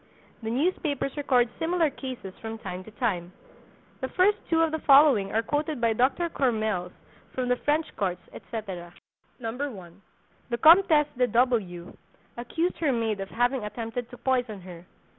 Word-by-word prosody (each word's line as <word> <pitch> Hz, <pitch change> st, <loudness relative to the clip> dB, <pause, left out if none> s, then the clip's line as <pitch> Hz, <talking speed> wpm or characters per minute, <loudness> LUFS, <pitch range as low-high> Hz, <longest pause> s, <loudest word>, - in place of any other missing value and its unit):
The 220 Hz, -, -4 dB
newspapers 285 Hz, 0 st, -1 dB
record 260 Hz, -4 st, +2 dB
similar 330 Hz, -2 st, +1 dB
cases 255 Hz, -9 st, -7 dB
from 225 Hz, 0 st, -5 dB
time 185 Hz, -4 st, -6 dB
to -, -, -11 dB
time. 180 Hz, -8 st, -1 dB, 0.7 s
The 260 Hz, -, -2 dB
first 400 Hz, +7 st, +3 dB
two 330 Hz, -1 st, +4 dB
of 325 Hz, -, +1 dB
the 315 Hz, -, -2 dB
following 275 Hz, -9 st, +5 dB
are 225 Hz, +1 st, +1 dB
quoted 295 Hz, +2 st, -2 dB
by 230 Hz, -1 st, +2 dB
Dr. 265 Hz, +9 st, +1 dB
Courmelles 215 Hz, -, -1 dB, 0.4 s
from 255 Hz, -1 st, -1 dB
the 250 Hz, -, +4 dB
French 300 Hz, +4 st, +1 dB
courts, 180 Hz, -3 st, -1 dB
etc. 190 Hz, -7 st, -7 dB, 0.4 s
1. 225 Hz, -7 st, -6 dB, 0.5 s
The 235 Hz, -, -1 dB
Comtesse 320 Hz, -, +6 dB
de 250 Hz, -, +4 dB
W— 220 Hz, -9 st, 0 dB, 0.4 s
accused 325 Hz, +9 st, -2 dB
her 310 Hz, -4 st, +2 dB
maid 225 Hz, -4 st, -1 dB
of 195 Hz, 0 st, -5 dB
having 245 Hz, 0 st, 0 dB
attempted 230 Hz, +3 st, -5 dB
to 245 Hz, -, -11 dB
poison 245 Hz, -7 st, -1 dB
her. 175 Hz, -1 st, -11 dB
245 Hz, 155 wpm, -27 LUFS, 210-290 Hz, 0.7 s, Comtesse